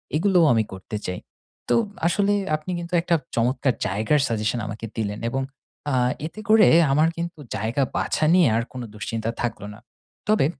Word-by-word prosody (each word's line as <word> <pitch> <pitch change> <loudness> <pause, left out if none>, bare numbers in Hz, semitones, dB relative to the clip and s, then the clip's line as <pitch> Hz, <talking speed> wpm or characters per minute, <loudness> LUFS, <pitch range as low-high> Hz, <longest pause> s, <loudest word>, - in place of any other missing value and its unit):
এগুলোও 180 0 +4
আমি 110 -1 +3
করতে 95 +3 -6
চাই। 90 0 -3 0.5
তো 230 -2 +3 0.2
আসলে 200 +3 +2 0.2
আপনি 155 +4 -6
কিন্তু 170 +1 -8
একটা 170 0 +1 0.2
চমৎকার 125 +2 +1
জায়গার 110 +9 +1
suggestion 115 +1 -1
আমাকে 110 +2 -6
দিলেন 105 -1 -2
এবং 135 +2 -1 0.5
আ - - -1 0.3
এতে 165 +7 -7
করে 220 0 +7 0.2
আমার 155 +4 +4
কিন্তু 170 -1 -4 0.2
জায়গা 115 +6 0
বাছা 155 - 0
নিয়ে 180 -4 +6
আর 115 - +1
কোনো 125 -2 -6
দুশ্চিন্তা 110 +1 -4
থাকলো 115 -4 -3
না। 110 - -15 0.5
তবে 215 -9 +3
130 Hz, 165 wpm, -23 LUFS, 110-170 Hz, 0.5 s, করে